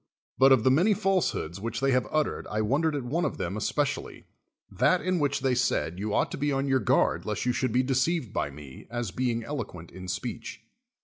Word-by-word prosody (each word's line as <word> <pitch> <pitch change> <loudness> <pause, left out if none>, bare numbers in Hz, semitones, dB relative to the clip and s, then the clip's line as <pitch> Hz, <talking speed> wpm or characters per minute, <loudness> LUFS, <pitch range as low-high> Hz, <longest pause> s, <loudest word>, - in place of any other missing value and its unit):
But 135 +1 +7
of 130 -5 +5
the 130 - +5
many 185 +10 +4
falsehoods 175 - 0
which 115 +1 -3
they 135 0 +2
have 125 -1 +2
uttered 155 -1 -1
I 105 - -1
won 130 +8 +1
dered 160 -2 +1
at 140 - -2
one 155 +8 -1
of - - -1
them 90 +3 -3
especially, 110 - -2 0.5
that 185 - +3
in 185 -1 0
which 140 -1 0
they 130 -1 +2
said 120 -8 0
you 105 +1 -2
ought - - +1
to - - -5
be 145 +1 +1
on 135 0 0
your 135 -1 +3
guard - - +2
lest 105 +1 -3
you 125 - +2
should 130 -1 0
be 125 +3 +2
deceived 135 - 0
by - - -1
me, 70 -2 -12
as 120 -4 -3
being 120 +2 -1
eloquent 100 - -6
in 95 0 -9
speech. 115 +5 -5
125 Hz, 225 wpm, -27 LUFS, 105-140 Hz, 0.5 s, But